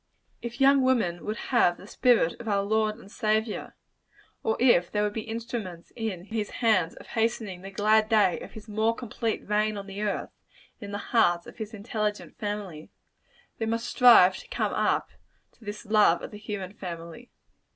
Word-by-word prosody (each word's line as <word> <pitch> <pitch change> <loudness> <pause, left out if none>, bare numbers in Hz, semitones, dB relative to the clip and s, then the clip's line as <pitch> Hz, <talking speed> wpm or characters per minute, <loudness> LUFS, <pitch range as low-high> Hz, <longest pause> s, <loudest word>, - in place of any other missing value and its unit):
If 235 0 -6
young 275 0 +6
women 230 -10 +1
would 215 +2 -3 0.2
have 175 -8 +4
the - - -13
spirit 225 -5 +3
of 235 - -9
our 200 -2 +1
Lord 215 +1 +1
and 205 -4 -15
Saviour 220 -1 -1 0.7
or 220 - 0
if 235 -9 +4
they 210 - -1
would 210 0 0
be 220 - -3
instruments 220 -6 -6
in 210 -6 -4
his 215 -1 -3
hands 215 -8 +1
of - - -13
hastening 220 -5 -1
the 195 - -8
glad 215 +2 +3
day 210 -6 +3
of - - -10
his 220 0 -11
more 220 +2 +1
complete 230 -1 -3
reign 210 0 +1
on 200 - -6
the 195 +1 -7
earth 210 -1 -2 0.5
and 210 - -8
in - - -8
the 205 - -3 0.2
hearts 175 -7 +3
of - - -12
his 220 -2 -6
intelligent 210 0 -3
family 205 -7 -5 0.7
they 225 - -1
must 230 +1 -1
strive 230 -7 +6
to - - -12
come - - -1
up - - 0 0.4
to 240 - -22
this 210 +1 -7
love 210 -5 +4
of - - -7
the 210 - -9
human 205 -3 -5
family. 175 +4 -8
215 Hz, 185 wpm, -27 LUFS, 195-225 Hz, 0.7 s, young